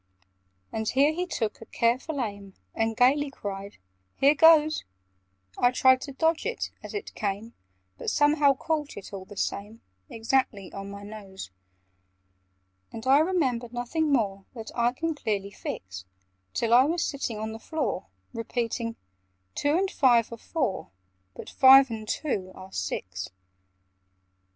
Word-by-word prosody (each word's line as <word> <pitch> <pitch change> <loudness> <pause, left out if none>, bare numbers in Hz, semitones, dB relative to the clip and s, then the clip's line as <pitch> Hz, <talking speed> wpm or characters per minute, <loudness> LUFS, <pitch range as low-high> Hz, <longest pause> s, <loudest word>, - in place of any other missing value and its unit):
And 220 0 -2
here 280 +4 +3
he 360 +2 -2
took 225 -11 -3
a 225 - -11
careful 255 +6 0
aim, 200 -4 -6 0.2
And 225 0 -1
gaily 280 +4 +4
cried 200 -5 -7 0.4
"Here 280 +2 +5
goes!" 310 0 +5 0.8
I 245 - +5
tried 260 +1 +4
to 280 - -6
dodge 320 +4 +1
it 470 - -3
as - - -8
it 415 - -5
came, 210 +3 -3 0.5
But - - -2
somehow 290 -1 +4
caught 300 +1 -3
it, 200 +1 -9
all 190 -1 -6
the 205 +1 -13
same, 210 +4 -3 0.3
Exactly 225 -4 -1
on 195 0 -6
my 200 0 -9
nose. 200 - -9 1.4
And 225 +1 -8
I 270 +2 +6
remember 280 -9 +1
nothing 285 +6 -1
more 200 -7 0
That 225 -2 -7
I 235 0 +2
can 325 +6 -2
clearly 205 -8 -3
fix, 90 - -7 0.5
Till 230 0 +1
I 250 +2 +7
was 330 +3 0
sitting 275 -6 -3
on 220 +1 -4
the 220 - -8
floor, 310 - -3 0.3
Repeating 230 0 -3 0.6
"Two 290 +3 +1
and 385 +1 0
five 240 - +3
are - - -7
four, 245 - -2 0.5
But - - -9
five 265 -1 +7
and 215 -1 -6
two 200 -9 -2
are 190 0 -11
six." 90 - -4
240 Hz, 145 wpm, -27 LUFS, 205-290 Hz, 1.4 s, I